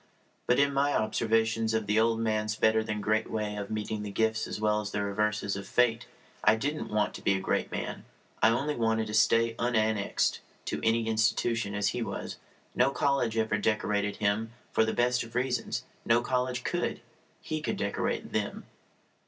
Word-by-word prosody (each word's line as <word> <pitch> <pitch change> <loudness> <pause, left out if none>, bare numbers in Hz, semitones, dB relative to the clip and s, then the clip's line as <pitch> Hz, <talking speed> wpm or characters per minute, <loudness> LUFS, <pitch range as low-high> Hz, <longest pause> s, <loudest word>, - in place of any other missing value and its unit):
But 125 - +4
in 140 0 +3
my 140 +1 +2
observations 110 0 +1
of 110 -1 0
the 105 +2 +2
old 115 0 +2
man's 110 -1 0
better 110 0 +3
than 105 -1 -3
great 110 +1 +1
way 105 -1 -2
of 100 -1 -5
meeting 110 0 -3
the 105 - -5
gifts 110 +2 0
as - - -5
well 105 0 +2
as 105 - -5
the 105 -1 -2
reverses 105 0 0
of 100 - -6
fate 120 -1 +2 0.4
I 110 - +6
didn't 145 +7 -3
want 105 0 0
to - - -8
be 100 - +2
a - - -1
great - - -1
man. - - -4 0.4
I 110 - +6
only 140 +6 0
wanted 110 -1 +1
to 105 - -6
stay 115 +1 +4
unannexed 110 -3 +1 0.3
to - - -2
any 115 0 +2
institution 110 -1 +1
as 100 0 +1
he 125 - -3
was. 100 -4 -4 0.4
No - - +3
college 130 -4 0
ever 110 -1 +1
decorated 105 -1 0
him. 110 +2 0 0.2
For 110 - +3
the 110 - -1
best 125 0 +2
of 115 0 -8
reasons. 125 -1 -1 0.2
No 115 +1 +3
college 125 0 -1
could. - - -2 0.4
He 155 0 -4
could - - -2
decorate 100 - -2
them. - - -2
110 Hz, 185 wpm, -29 LUFS, 105-115 Hz, 0.4 s, I